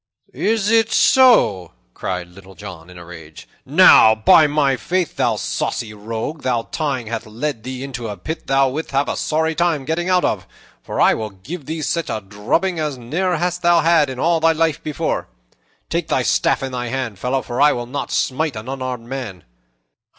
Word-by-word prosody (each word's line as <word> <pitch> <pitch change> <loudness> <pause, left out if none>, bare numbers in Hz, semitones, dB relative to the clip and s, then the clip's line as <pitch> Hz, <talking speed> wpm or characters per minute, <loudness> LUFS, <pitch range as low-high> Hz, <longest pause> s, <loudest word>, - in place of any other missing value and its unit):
'" - - -35 0.2
"Is 220 -2 0
it 225 -1 +3
so?" 220 - +4 0.2
cried 90 -1 -4
Little 95 +1 -15
John 85 -1 -10
in 90 - -13
a 85 - -11
rage. 80 -7 -12 0.2
"Now, 110 0 +7
by 110 +8 +5
my 145 -2 +1
faith, 180 +4 -2
thou - - +1
saucy 110 -2 -3
rogue, 110 +8 -5
thy 120 -3 0
tongue 140 -6 -2
hath 115 0 -5
led 115 +3 -4
thee 130 +2 -6
into 125 -4 -6
a 105 -1 -6
pit 160 - -6
thou 135 0 +3
wilt 155 +5 -5
have 140 +1 0
a - - -2
sorry 160 +1 0
time 160 -4 0
getting 175 +4 -2
out 180 -1 +3
of; 95 -4 -2 0.3
for - - -6
I - - +5
will 110 -1 -4
give 130 - -9
thee 160 0 -4
such 165 +4 -2
a 110 - -2
drubbing 105 - -2
as 150 -4 -2
ne'er 165 +9 -1
hast 180 +2 -2
thou 170 -1 +4
had 160 -3 +3
in 130 - -6
all 165 +4 +2
thy 165 0 +3
life 160 -1 0
before. 155 -2 -3 0.6
Take - - -2
thy - - 0
staff - - +1
in 135 - -4
thy 125 -1 -4
hand, 115 -5 -4
fellow, 130 +3 -1
for 120 +2 -3
I 150 - +6
will 120 0 -3
not 130 +4 -5
smite 145 +1 -1
an 110 +2 -7
unarmed 130 -3 -5
man. 120 -9 -6
135 Hz, 200 wpm, -19 LUFS, 110-160 Hz, 0.6 s, Now